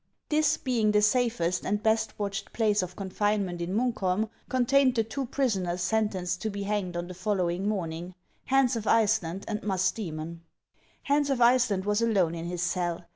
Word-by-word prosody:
This, 310 0 +3
being 230 -5 +1
the 210 - +4
safest 210 -6 +1
and 205 +2 -1
best 220 0 +1
watched 200 -1 -4
place 210 -3 +2
of 180 -1 -6
confinement 195 -2 -1
in 175 +3 -2
Muukholm, 220 -3 0 0.2
con 255 -2 +1
tained 270 0 +4
the 225 - +2
two 260 +4 -4
prisoners 190 -10 -1
sentenced 185 -5 -1
to 220 - -1
be 200 -1 -4
hanged 200 -4 -2
on 175 0 -3
the 180 - -7
following 185 0 -1
morning, 175 -3 -4 0.3
Hans 270 -2 +3
of 220 -2 -4
Iceland 205 -4 +2
and 210 -1 -3
Musdoemou. 180 -4 -2 0.6
Hans 285 0 +1
of 270 -3 0
Iceland 235 -5 +3
was 210 +1 +1
alone 195 -8 +2
in 165 0 -5
his 175 0 -3
cell. 175 -1 -2
205 Hz, 175 wpm, -28 LUFS, 180-230 Hz, 0.6 s, the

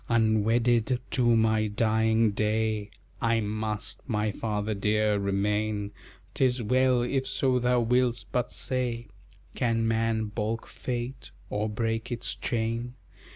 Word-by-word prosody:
Unwedded 115 +2 +2
to 120 -2 +3
my 110 -1 +3
dying 110 +1 +2
day 110 0 0 0.3
I 115 -2 +2
must, 110 0 -3
my 105 -1 0
father 105 0 -2
dear, 105 +1 +1
remain; 105 +1 0 0.4
'Tis 125 -2 +1
well, 125 +1 +3
if 130 +2 -1
so 135 -1 +1
thou 125 0 +2
will'st, 125 +1 +1
but 125 -1 0
say 125 -3 -2 0.4
Can 115 -2 +1
man 115 0 +1
balk 110 +1 -2
Fate, 125 +1 -5 0.2
or 105 +1 -1
break 115 +2 -2
its 120 0 -3
chain? 115 0 -2
115 Hz, 120 wpm, -28 LUFS, 110-120 Hz, 0.4 s, to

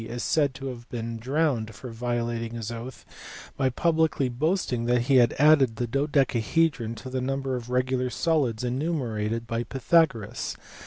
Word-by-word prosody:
is 120 +1 -5
said 145 -4 +1
to 135 +1 -8
have 120 -2 -7
been 115 -1 -4
drowned 125 -4 0
for 125 +3 -8
violating 120 0 -2
his 115 -1 -4
oath 120 +3 -8 0.5
by 135 -2 +1
publicly 160 -1 +1
boasting 125 -2 0
that 120 0 +2
he 130 +2 +3
had 120 -2 +4
added 140 -5 +5
the 120 - -1
dodecahedron 135 -1 +1
to 115 - -9
the 130 0 -2
number 135 0 -2
of 120 -1 -6
regular 125 0 0
solids 130 -7 0
enumerated 120 -5 -2
by 115 0 -2
Pythagoras. 135 -2 +1
125 Hz, 155 wpm, -26 LUFS, 115-140 Hz, 0.5 s, added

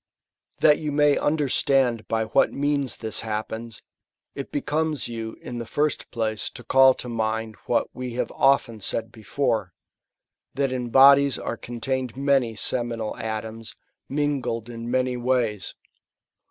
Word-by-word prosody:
That 150 -1 +6
you 150 -1 -3
may 145 0 +4
understand 135 -5 +1
by 110 0 0
what 110 +5 +3
means 140 -2 0
this 110 -1 -3
happens, 110 +1 -5 0.5
it 140 - -7
becomes 155 0 -1
you 115 -1 -6
in 120 -1 -5
the 115 - -5
first 150 +3 -1
place 110 -3 -2
to 125 - -12
call 130 +2 +6
to - - -8
mind 110 -1 -2
what - - +2
we 125 -1 -5
have 125 - -2
often 135 -5 +2
said 110 +2 -3
before, 110 -4 -2 0.8
that 140 -1 0
in 125 -2 -3
bodies 140 +1 +6
are - - -4
contained 120 +2 -4
many 135 -5 +2
seminal 115 +1 -2
atoms, 110 0 -5 0.3
mingled 135 -5 -1
in 115 0 -6
many 125 0 0
ways. 120 -5 -1
120 Hz, 140 wpm, -24 LUFS, 115-140 Hz, 0.8 s, That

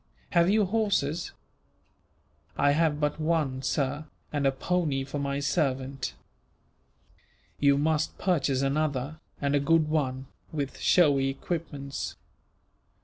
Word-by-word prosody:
"Have 170 +1 +4
you 210 0 +4
horses?" 190 -7 0 1.3
"I 145 - +4
have 155 0 +2
but 150 +1 -1
one, 155 -5 0
sir, 140 +2 -1 0.3
and 145 -2 +2
a - - +4
pony 145 -1 0
for 140 +2 -5
my 140 0 -1
servant." 135 -2 -1 1.4
"You 140 -1 +4
must 155 +1 0
purchase 140 -7 +1
another, 145 +1 -1 0.2
and 140 0 0
a 145 - +4
good 155 +2 +3
one, 135 -4 -1 0.3
with 145 -3 -4
showy 140 -6 +4
equipments. 140 -1 -4
145 Hz, 115 wpm, -28 LUFS, 135-160 Hz, 1.4 s, Have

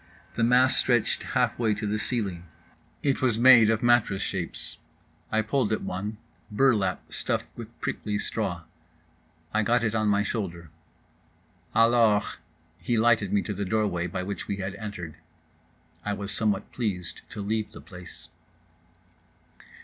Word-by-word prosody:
The 115 - 0
mass 125 +3 +5
stretched 120 -3 +2
halfway 110 -3 +1
to 105 +1 -4
the 105 +1 -1
ceiling. 100 -6 -2 0.6
It 140 -2 +1
was 125 -4 +2
made 120 -2 +8
of 110 0 +1
mattress 120 -5 +3
shapes. 90 -3 -4 0.5
I 110 0 +2
pulled 115 0 0
at 110 - -1
one—burlap, 105 +1 -1
stuffed - - -1
with - - -10
prickly 105 -1 -2
straw. 95 -6 -3 0.9
I 110 - +3
got 120 +3 +2
it 110 -2 0
on 110 -1 +1
my 100 0 +3
shoulder. 85 -7 -4 1.0
"Alors." 115 -2 +4 0.4
He 115 +8 0
lighted 110 -3 +3
me 100 -1 +2
to 105 - -3
the 100 +1 -3
door 110 +3 +1
way 85 -3 -1
by 90 +1 -4
which 100 +2 -5
we 100 - -1
had 95 -1 -4
entered. 90 -8 -7 0.9
(I 105 - -1
was 100 0 -4
somewhat 105 -3 0
pleased 95 -8 -3
to 115 - -8
leave 110 +1 -1
the - - -11
place.) 90 -2 -11
105 Hz, 145 wpm, -27 LUFS, 100-115 Hz, 1.0 s, made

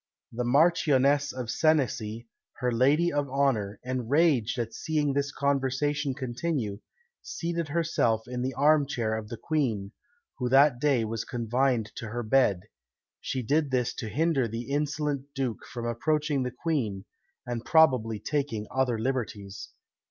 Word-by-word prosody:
The 125 +2 -3
Marchioness 145 0 +3
of 125 -3 -4
Senecy, 120 -8 0 0.3
her 125 -1 -1
lady 145 +8 +3
of 145 -1 -1
honour, 125 -7 0
enraged 130 0 +1
at 115 -2 -3
seeing 150 -3 -1
this 140 +1 -1
conversation 140 0 0
continue, 125 -5 -3 0.4
seated 170 - -3
herself 145 -8 +1
in 125 0 -4
the 130 0 -2
arm 145 +1 +4
chair 115 -5 -1
of 110 -1 -5
the 115 - -6
Queen, 115 -11 -1 0.5
who 125 -1 -1
that 135 -1 +5
day 135 -5 +2
was 110 0 -3
confined 120 -1 0
to 115 - -5
her 120 +3 -4
bed; 110 -5 +3 0.6
she 130 -2 -3
did 145 +5 +1
this 125 -2 0
to 110 -4 -5
hinder 140 +1 +1
the 115 +4 -6
insolent 145 -1 -1
duke 130 -4 -2
from 120 -2 -5
approaching 150 +4 0
the 125 - -1
Queen, 120 - -2 0.4
and 120 -2 -4
probably 130 -9 +4
taking 140 -5 -2
other 130 -3 +1
liberties. 110 -5 -4
130 Hz, 145 wpm, -28 LUFS, 115-145 Hz, 0.6 s, that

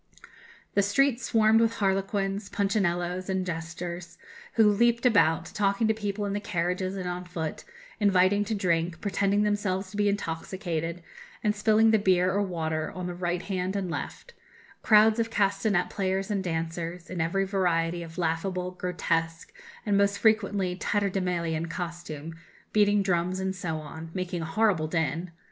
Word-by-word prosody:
"The 200 - +4
streets 250 +5 +2
swarmed 220 -1 +4
with 230 0 +2
harlequins, 195 0 -1
punchinellos, 185 -2 0
and 190 -1 0
jesters, 170 0 -5 0.4
who 225 -2 +6
leaped 235 +3 +2
about, 185 -9 +4
talking 200 +2 +1
to 220 - +3
people 205 -1 -3
in 200 - -2
the 205 - -1
carriages 185 0 -2
and 185 -1 -4
on 180 0 -3
foot, 170 -3 -5 0.4
inviting 200 0 +4
to 220 - -2
drink, 170 -3 0
pretending 200 0 +1
themselves 205 -2 -1
to 205 - -7
be 205 -1 +3
intoxicated, 170 -2 -3 0.4
and 210 -1 +2
spilling 220 +1 +4
the 220 - +4
beer 185 -2 +3
or 200 - +1
water 160 -5 -2
on 180 -1 -4
the 180 - -3
right 175 0 -2
hand 190 0 -2
and 190 -3 -2
left; - - -6 0.5
crowds 215 +1 +5
of 230 0 0
castanet 200 -3 +1
players 190 +1 -1
and 200 -2 0
dancers, 165 0 -3
in 180 -2 -2
every 195 +4 +1
variety 175 -3 0
of 165 -1 -9
laughable, 180 +2 -1
grotesque, 165 -2 -2 0.3
and 200 -2 +2
most 200 0 +2
frequently 205 -4 +2
tatterdemalion 180 -5 -1
costume, 165 -3 -6 0.4
beating 205 -1 +4
drums, 180 0 0
and 190 0 -2
so 170 -3 -3
on 160 +1 -8
making 180 -2 -3
a - - -3
horrible 170 -2 +1
din. 165 +1 -1
185 Hz, 155 wpm, -27 LUFS, 170-205 Hz, 0.5 s, who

